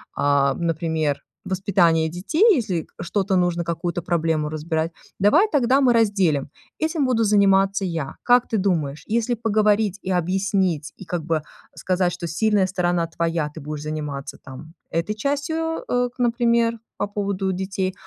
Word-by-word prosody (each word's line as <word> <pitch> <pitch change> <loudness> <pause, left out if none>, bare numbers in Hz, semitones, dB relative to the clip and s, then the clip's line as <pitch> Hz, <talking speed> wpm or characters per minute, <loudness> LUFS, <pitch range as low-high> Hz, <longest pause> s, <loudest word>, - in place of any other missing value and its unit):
а, 140 -1 +2
например, 160 -3 -1 0.2
воспитания 185 -4 +2
детей, 190 - 0
если 190 - -2
что-то 195 +2 0
нужно, 175 -1 +1
какую-то 170 +1 -2
проблему 165 -3 0
разбирать, 160 +1 -2 0.3
давай 305 - +4
тогда 270 -1 +3
мы 255 -2 +5
разделим. 195 -11 +2 0.3
Этим 315 -2 0
буду 235 -3 +2
заниматься 195 -1 +3
я. 165 -6 -4
Как 245 0 +4
ты 225 - -1
думаешь, 155 -7 -1
если 235 +2 0
поговорить 210 -2 +1
и - - -6
объяснить, 185 -3 0
и - - -10
как 170 -1 -3
бы 160 -2 0 0.3
сказать, 180 -1 0
что 175 0 -5
сильная 200 +4 +2
сторона 175 -2 0
твоя, 165 -1 -1
ты 160 - -8
будешь 150 +1 -6
заниматься 150 -3 -5
там 145 +4 -11 0.2
этой 170 +6 -1
частью, 290 +7 -2
э, 245 0 +1
к - - -34
например, 235 -1 +2 0.2
по 205 - -1
поводу 200 -2 -2
детей, 190 0 -2
185 Hz, 150 wpm, -22 LUFS, 165-215 Hz, 0.3 s, мы